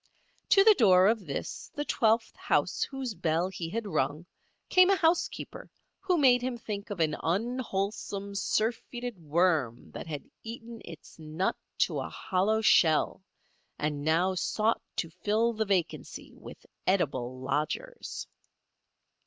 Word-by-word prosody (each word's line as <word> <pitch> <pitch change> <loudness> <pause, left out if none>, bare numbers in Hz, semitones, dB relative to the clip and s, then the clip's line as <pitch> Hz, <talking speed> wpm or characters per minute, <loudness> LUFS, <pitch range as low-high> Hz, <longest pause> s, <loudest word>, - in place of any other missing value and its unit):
To 390 - +7
the 435 +1 +8
door 185 - +5
of 215 -3 +2
this, 140 - -5
the 290 0 -2
twelfth 225 -3 +1
house - - 0
whose 270 -4 -2
bell 165 -1 0
he 175 -3 -5
had 225 +4 -3
rung, 150 -3 -1 0.4
came 370 0 +6
a 390 - +5
housekeeper 335 -1 -1 0.3
who 370 -2 +1
made 255 -5 +5
him 250 -1 -2
think 210 -2 -6
of 205 -4 -5
an 155 -2 +2
unwholesome, 200 0 -2
surfeited 225 +2 -2
worm 155 -6 0
that - - -7
had 150 -3 -5 0.2
eaten 230 0 -8
its 165 -1 -12
nut 160 +4 -1 0.3
to - - -4
a - - -4
hollow 205 +4 0
shell 165 -5 +4 0.6
and 150 -1 -2
now 170 +5 +2
sought 215 +4 0
to 165 - -3
fill 215 +6 +1
the 220 0 -1
vacancy 185 -4 -2
with - - -12 0.2
edible 130 -9 0
lodgers. 150 - -3
200 Hz, 135 wpm, -29 LUFS, 165-235 Hz, 0.6 s, the